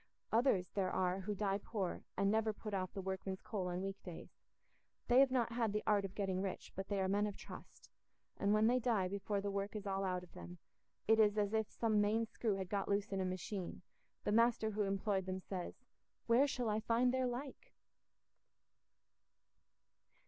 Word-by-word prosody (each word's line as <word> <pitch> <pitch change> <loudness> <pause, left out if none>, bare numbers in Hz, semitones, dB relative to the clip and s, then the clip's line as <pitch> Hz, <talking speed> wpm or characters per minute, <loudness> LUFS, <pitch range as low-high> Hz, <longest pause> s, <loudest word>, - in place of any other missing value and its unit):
Others 220 -6 +3
there 190 -2 +1
are 185 0 +1
who 205 +2 -3
die 195 0 0
poor 200 -4 -3 0.2
and 195 0 +3
never 220 0 +2
put 210 0 -7
off 185 -2 -1
the 195 - -5
workman's 190 0 -3
coat 190 -4 -2
on 180 +1 -2
weekdays. 195 -3 -6 0.8
They 245 +1 +6
have 275 0 +7
not 245 -3 +1
had 230 -3 0
the 210 - -1
art 205 -2 +3
of 190 - -7
getting 190 -2 -1
rich, 195 -1 -4
but 195 0 -4
they 200 -1 -1
are 190 - +1
men 205 +2 +2
of 205 - -6
trust, - - -11 0.4
and 200 - +1
when 215 +1 +4
they 245 +2 +4
die 225 -6 +1
before 200 +1 -2
the 200 0 -2
work 200 +2 -2
is 210 -1 -4
all 195 0 -1
out 180 -1 -1
of 180 - -14
them, 175 0 -9 0.5
it 220 +1 +5
is 210 -1 +5
as 205 0 +1
if 220 -1 +1
some 215 -2 +2
main 220 +2 +2
screw 220 -2 -1
had 190 -1 -3
got 200 0 -1
loose 200 0 0
in 195 -1 0
a - - 0
machine; 185 0 -4 0.4
the - - 0
master 230 0 +3
who 210 0 -1
employed 195 -1 0
them 185 0 -2
says, 185 -1 -5 0.5
"Where 240 +5 +5
shall 250 -3 -1
I 210 +1 +1
find 235 +3 +2
their 260 -1 +2
like?" 275 - -6
205 Hz, 200 wpm, -37 LUFS, 190-220 Hz, 0.8 s, have